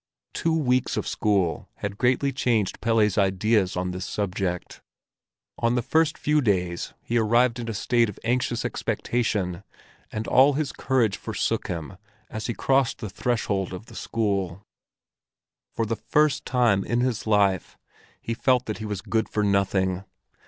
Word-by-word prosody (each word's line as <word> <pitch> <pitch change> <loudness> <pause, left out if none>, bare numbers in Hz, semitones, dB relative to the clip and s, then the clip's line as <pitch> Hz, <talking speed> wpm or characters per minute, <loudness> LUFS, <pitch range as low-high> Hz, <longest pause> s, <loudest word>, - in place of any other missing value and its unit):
Two 165 -1 +1
weeks 130 -4 +1
of - - -2
school 95 -7 0
had 100 0 -5
greatly 130 +3 +2
changed 115 -6 0
Pelle's 110 -2 +2
ideas 95 0 +2
on 90 0 -1
this 90 +1 -5
subject. 95 -3 -3 0.8
On 115 +1 +2
the 120 - 0
first 160 +3 +2
few 150 0 +2
days 90 -7 -1
he 120 0 +1
arrived 115 +2 +3
in 115 -1 -4
a - - -2
state 120 +2 +2
of 105 - -9
anxious 120 0 0
expectation, 100 -7 -1 0.5
and 110 +1 -4
all 135 +3 +5
his 145 0 -1
courage 120 -7 +1
forsook - - -2
him 85 +2 -5 0.3
as 110 0 -4
he 120 - -2
crossed 135 -2 +2
the 110 -5 -6
threshold 100 -4 -1
of 90 +4 -7
the - - -14
school. 100 -4 -2 1.1
For 115 - 0
the 115 +1 -2
first 150 -1 +1
time 120 -6 +3
in 120 +1 0
his 125 -3 -1
life 100 -4 +2 0.4
he 115 - -3
felt 125 +1 +2
that 110 - -4
he 110 - -5
was 105 -3 -3
good 110 -1 0
for 105 - 0
nothing. 95 -2 +1
110 Hz, 160 wpm, -25 LUFS, 95-125 Hz, 1.1 s, all